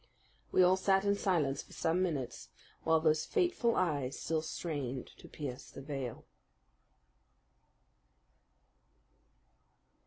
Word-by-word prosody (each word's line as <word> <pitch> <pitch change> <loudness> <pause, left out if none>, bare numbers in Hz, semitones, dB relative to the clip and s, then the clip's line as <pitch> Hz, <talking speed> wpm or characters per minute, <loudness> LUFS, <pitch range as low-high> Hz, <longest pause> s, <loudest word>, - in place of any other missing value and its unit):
We 185 - +6
all 185 +1 +5
sat 195 +1 +3
in 200 - +4
silence 170 -9 +1
for - - -16
some 165 +3 +1
minutes 140 -9 -2 0.3
while 160 0 +4
those 155 -1 +2
fateful 305 -10 +2
eyes 145 -7 0
still 160 -1 0
strained 145 -6 -4
to - - -13
pierce 135 -4 -6
the 135 - -9
veil. 135 -4 -5
160 Hz, 105 wpm, -33 LUFS, 135-185 Hz, 0.3 s, We